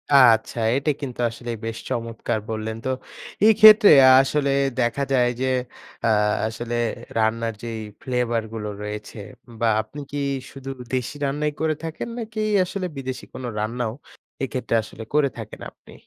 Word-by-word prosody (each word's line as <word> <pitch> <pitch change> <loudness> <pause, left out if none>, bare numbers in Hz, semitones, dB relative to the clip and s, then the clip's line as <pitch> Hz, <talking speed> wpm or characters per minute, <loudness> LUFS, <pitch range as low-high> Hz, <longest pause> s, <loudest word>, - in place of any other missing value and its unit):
আচ্ছা। 120 -3 +5 0.2
এটা 140 +3 +1
কিন্তু 130 -4 -6
আসলে 120 +1 -7
বেশ 115 0 -4
চমৎকার 115 -1 -2
বললেন। 110 0 -3
তো - - 0 0.6
এক্ষেত্রে 215 0 +8 0.3
আসলে 140 +1 0 0.3
দেখা 120 +3 +1
যায় 125 -2 +4
যে, - - +1 0.6
আ - - +3 0.4
আসলে 115 +2 -4 0.4
রান্নার 115 +1 +1
যেই 115 -1 -4 0.2
ফ্লেভারগুলো 115 -4 -2
রয়েছে 105 +1 -6 0.4
বা 115 - +2
আপনি 110 +7 -11
কি 145 - -4 0.3
শুধু 135 0 -9 0.2
দেশি 130 +3 -2
রান্নাই 150 +2 -1
করে 155 -1 +1
থাকেন? 165 +7 -5
নাকি 220 -1 -5 0.3
আসলে 185 +1 -4
বিদেশি 130 -1 -5
কোন 130 - -7 0.2
রান্নাও 115 +1 -2 0.5
এক্ষেত্রে 130 -3 -2
আসলে 110 - -9
করে 145 -2 +3
থাকেন - - -8
আপনি? - - -18
125 Hz, 140 wpm, -23 LUFS, 115-140 Hz, 0.6 s, এক্ষেত্রে